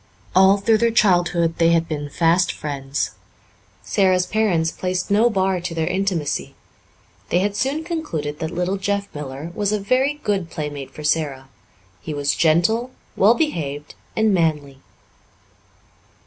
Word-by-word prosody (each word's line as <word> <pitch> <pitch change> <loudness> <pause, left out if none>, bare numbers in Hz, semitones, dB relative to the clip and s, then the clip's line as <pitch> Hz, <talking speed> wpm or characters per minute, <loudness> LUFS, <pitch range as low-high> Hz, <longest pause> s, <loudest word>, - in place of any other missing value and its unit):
All 190 +1 +6
through 215 +2 +2
their 235 +1 +3
childhood 175 -6 +2
they 165 0 +4
had 165 0 +2
been 145 -2 -4
fast 170 +4 +2
friends. 140 -2 -3 0.7
Sara's 185 -2 +2
parents 180 -7 +1
placed 185 +1 -3
no 220 +4 +4
bar 190 -3 0
to 170 -1 -5
their 160 -1 0
intimacy. 180 -4 -2 0.7
They - - +2
had 200 +2 0
soon 275 +7 -1
concluded 165 - -4
that 160 -2 -3
little 180 +3 -1
Jeff 200 +1 -2
Miller 145 +2 -6
was 205 +1 -1
a 210 - 0
very 255 +8 +1
good 195 -5 -1
playmate 145 -4 -5
for 150 +3 -10
Sara. 145 -3 -1 0.5
He 150 - -5
was 145 0 0
gentle, 175 +10 +2 0.3
well 215 +5 +5
behaved, 150 - -3 0.2
and 220 -1 +2
manly. 150 -6 0
175 Hz, 145 wpm, -21 LUFS, 155-200 Hz, 0.7 s, All